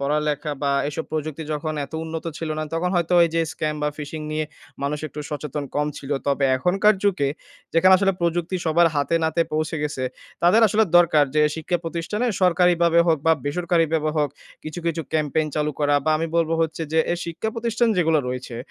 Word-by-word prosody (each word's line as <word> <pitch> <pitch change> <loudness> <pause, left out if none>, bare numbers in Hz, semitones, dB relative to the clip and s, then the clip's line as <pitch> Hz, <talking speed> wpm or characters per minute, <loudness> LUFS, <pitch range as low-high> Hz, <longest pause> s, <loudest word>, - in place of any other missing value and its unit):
পড়ালেখা 150 +1 -1
বা 140 0 +1 0.2
এইসব 150 +2 -4
প্রযুক্তি 155 0 -3
যখন 155 +1 -3
এত 140 - -15
উন্নত 160 0 -5
ছিল 165 - -4
না, - - -1
তখন 180 +2 0
হয়তো 170 +1 0
ওই 170 - +4
যে 165 - +2
scam 155 0 -2
বা 150 - +2
phishing 150 +1 -6
নিয়ে 155 0 -1 0.4
মানুষ 145 +1 -1
একটু 150 - -7
সচেতন 150 -1 -4
কম 150 0 +1
ছিল। 140 +1 -9 0.2
তবে 140 0 +1
এখনকার 195 +9 +3
যুগে, 180 -9 +2 0.4
যেখানে 175 +3 +5
আসলে 195 -1 +2
প্রযুক্তি 170 +1 0
সবার 170 +2 +4
হাতে-নাতে 160 +3 +1
পৌঁছে 155 +1 -1
গেছে, 145 -3 -2 0.4
তাদের 180 +7 +5
আসলে 215 +2 +3
দরকার 155 -4 +5
যে 150 - +4
শিক্ষা 165 +2 -2
প্রতিষ্ঠানে 170 +8 -2 0.2
সরকারিভাবে 170 -1 +4
হোক 165 -2 +3
বা 165 - +6
বেসরকারিভাবে 160 0 +1
হোক 145 -2 +1 0.3
কিছু, 155 +2 -6
কিছু 165 0 -1
ক্যাম্পেইন 155 0 +1
চালু 150 0 0
করা। 145 0 +3
বা 155 - +2
আমি 165 - -1
বলব 165 -1 +2
হচ্ছে 160 0 -1
যে 160 - +3
এ - - +1
শিক্ষা 170 +6 -4
প্রতিষ্ঠান 235 0 0
যেগুলা 165 -3 +3
রয়েছে, 125 -1 -5
160 Hz, 185 wpm, -23 LUFS, 150-170 Hz, 0.4 s, বা